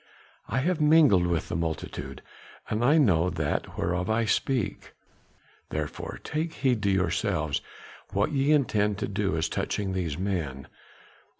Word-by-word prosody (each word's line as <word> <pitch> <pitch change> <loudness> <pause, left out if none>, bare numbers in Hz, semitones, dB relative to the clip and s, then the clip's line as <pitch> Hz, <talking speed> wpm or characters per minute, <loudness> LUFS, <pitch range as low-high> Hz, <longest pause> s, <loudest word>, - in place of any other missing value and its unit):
I 135 - 0
have 170 +2 0
mingled 150 - +5
with 85 -3 -1
the - - -2
multitude 80 -1 -4 0.5
and 110 +2 0
I 145 +6 +5
know 90 - +4
that 75 -4 -2
whereof 90 +2 -1
I 115 +1 +2
speak; 125 +1 -1 0.8
therefore 75 -1 -4
take 160 +2 -2
heed 130 -7 +1
to 100 - +1
yourselves 80 -5 0 0.5
what 100 +7 +1
ye 140 0 +2
intend 105 -8 +2
to - - -2
do 100 -3 -1
as 80 0 +1
touching 95 +3 -2
these 85 -6 -2
men. 85 -9 -3
100 Hz, 140 wpm, -27 LUFS, 85-135 Hz, 0.8 s, mingled